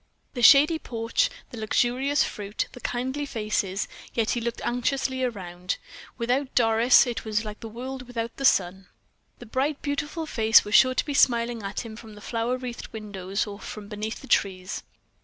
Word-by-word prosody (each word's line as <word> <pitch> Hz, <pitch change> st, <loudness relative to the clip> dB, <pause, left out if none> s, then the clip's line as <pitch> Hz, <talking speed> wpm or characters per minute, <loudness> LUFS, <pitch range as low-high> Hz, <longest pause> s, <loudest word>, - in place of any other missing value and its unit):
The 245 Hz, -, -4 dB
shady 295 Hz, +6 st, +7 dB
porch, 230 Hz, -, 0 dB, 0.2 s
the 235 Hz, -, -7 dB
luxurious 250 Hz, +6 st, +2 dB
fruit, 205 Hz, +1 st, -3 dB
the -, -, -11 dB
kindly 260 Hz, +4 st, -3 dB
faces, 210 Hz, -5 st, -1 dB, 0.3 s
yet 225 Hz, -2 st, +1 dB
he 240 Hz, -, -1 dB
looked 235 Hz, 0 st, -4 dB
anxiously 260 Hz, +2 st, 0 dB
around. 180 Hz, -6 st, -3 dB, 0.4 s
Without 255 Hz, +3 st, -1 dB
Doris 230 Hz, +2 st, +5 dB
it 235 Hz, -2 st, -4 dB
was 220 Hz, 0 st, -1 dB
like 210 Hz, 0 st, -7 dB
the 225 Hz, -, -7 dB
world 255 Hz, +3 st, -7 dB
without 230 Hz, -2 st, -4 dB
the 275 Hz, -, -5 dB
sun. 190 Hz, -5 st, +2 dB, 0.5 s
The 245 Hz, -, -11 dB
bright, 270 Hz, +5 st, -1 dB
beautiful 295 Hz, +2 st, -2 dB
face 225 Hz, -6 st, +5 dB
was 210 Hz, -, -5 dB
sure 255 Hz, +2 st, +6 dB
to -, -, +1 dB
be 290 Hz, -, -3 dB
smiling 235 Hz, -3 st, +3 dB
at 200 Hz, 0 st, -4 dB
him 220 Hz, -1 st, -8 dB
from 220 Hz, -1 st, -12 dB
the -, -, -11 dB
flower 235 Hz, +3 st, -1 dB
wreathed 250 Hz, -2 st, -6 dB
windows, 200 Hz, -2 st, -3 dB
or 205 Hz, -1 st, -8 dB
from 210 Hz, -2 st, -8 dB
beneath 215 Hz, +1 st, -5 dB
the -, -, -11 dB
trees. 185 Hz, -1 st, 0 dB
230 Hz, 175 wpm, -26 LUFS, 215-255 Hz, 0.5 s, shady